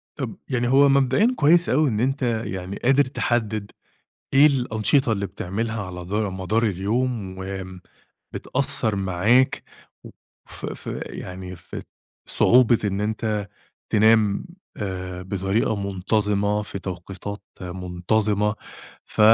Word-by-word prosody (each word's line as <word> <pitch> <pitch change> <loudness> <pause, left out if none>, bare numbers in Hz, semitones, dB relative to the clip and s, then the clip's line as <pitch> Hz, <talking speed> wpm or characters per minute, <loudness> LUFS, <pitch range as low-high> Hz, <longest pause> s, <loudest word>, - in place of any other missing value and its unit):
طب - - -4
يعني 120 -1 0
هو 140 +2 +6
مبدئيًا 140 - +3
كويس 165 +4 +4
أوي 150 +1 +3
إن 105 -2 -1
أنت 135 +3 0 0.2
يعني 95 +1 -5
قادر 135 +3 +5
تحدِّد 110 -5 -1 0.6
إيه 140 +2 +7
الأنشطة 125 -2 +2
اللي 100 -2 0
بتعملها 110 +4 -3
على 90 -1 -7
دا 100 +3 -3
مدار 95 +5 -1
اليوم، 105 0 -1
وآمم 95 -1 -6 0.5
بتأثَّر 110 -2 -1
معاك 100 +7 +2 0.4
و - - -9 0.4
في - - -6
في - - -6
يعني 90 0 -7
في 80 - -10
ات - - -11 0.4
صعوبة 120 -2 +5
إن 100 0 -1
أنت 105 -1 -1 0.4
تنام، 110 -1 +4 0.3
آآ، 90 -3 -4
بطريقة 100 +3 0
منتظِمة، 100 +1 0
في 100 - -6
توقيتات 95 +2 -6 0.2
منتظِمة. 95 +4 0 0.5
ف - - -6
105 Hz, 120 wpm, -23 LUFS, 95-120 Hz, 0.6 s, إيه